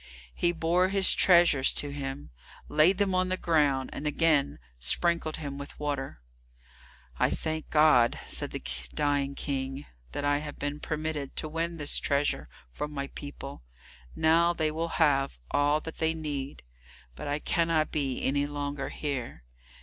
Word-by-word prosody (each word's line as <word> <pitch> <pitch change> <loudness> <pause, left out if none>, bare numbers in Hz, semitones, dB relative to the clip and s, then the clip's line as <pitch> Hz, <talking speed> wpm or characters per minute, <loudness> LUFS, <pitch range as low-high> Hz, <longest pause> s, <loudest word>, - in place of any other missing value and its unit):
He 175 - +1
bore 175 +2 +1
his 195 -1 +6
treasures 170 -7 +5
to 145 - 0
him, 140 - -6 0.4
laid 160 +5 +4
them 200 -2 +1
on 185 0 +1
the 185 - 0
ground, 145 -7 +1
and 150 - -4
again 150 - +2 0.2
sprinkled 160 - +1
him 140 -2 -6
with 140 - -9
water. 140 - -3 1.0
"I - - +3
thank 155 -1 -3
God," 150 -6 +4
said - - -1
the - - -6 0.3
dying 140 -1 0
King, 135 0 -3 0.3
"that 145 - -2
I 145 0 +2
have 150 -1 -7
been 145 +1 -3
permitted 155 -3 -4
to 155 - -2
win 165 +2 -3
this 145 -2 +2
treasure 140 - 0 0.2
for 150 - -4
my 140 -2 -5
people; 145 -1 -8 0.5
now 170 +2 +4
they 155 -2 0
will 165 +2 -2
have 140 - +2
all 145 +1 +3
that 160 - -8
they 160 0 +1
need. 145 -3 -5 0.5
But 70 - -7
I 145 0 0
cannot 165 0 +1
be 135 -4 -2
any 140 +1 +1
longer 145 -1 -4
here. 135 - -5
150 Hz, 155 wpm, -28 LUFS, 140-160 Hz, 1.0 s, his